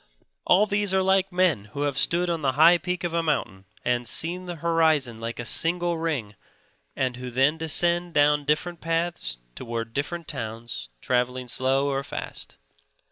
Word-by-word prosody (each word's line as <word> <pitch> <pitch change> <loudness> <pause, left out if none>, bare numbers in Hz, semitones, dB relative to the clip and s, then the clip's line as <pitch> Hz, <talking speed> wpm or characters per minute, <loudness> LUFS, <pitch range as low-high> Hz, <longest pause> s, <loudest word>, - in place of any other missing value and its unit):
All 195 +4 +5
these 205 -2 0
are 190 - +3
like 190 0 +2
men 180 - +2
who 145 - -2
have 145 -2 0
stood 170 +6 +2
on 170 -2 -1
the 135 -2 +1
high 165 +5 +6
peak 180 0 -3
of 175 -1 -2
a 170 - +2
mountain 120 -11 -2 0.2
and 120 -1 +1
seen 175 - -2
the 175 - -4
horizon 160 -7 +1
like 115 +1 -5
a 120 - -5
single 175 +8 +1
ring 140 -11 -2 0.6
and 130 -2 -1
who 125 0 -6
then 135 +6 +2
descend 170 +2 +1
down 145 0 +4
different 160 +4 -1
paths 165 - -1 0.2
towards 115 - -5
different 165 +5 -3
towns, 115 - -5
traveling 125 0 0
slow 135 +3 +1
or 135 -1 -1
fast. - - -7
150 Hz, 170 wpm, -25 LUFS, 125-175 Hz, 0.6 s, high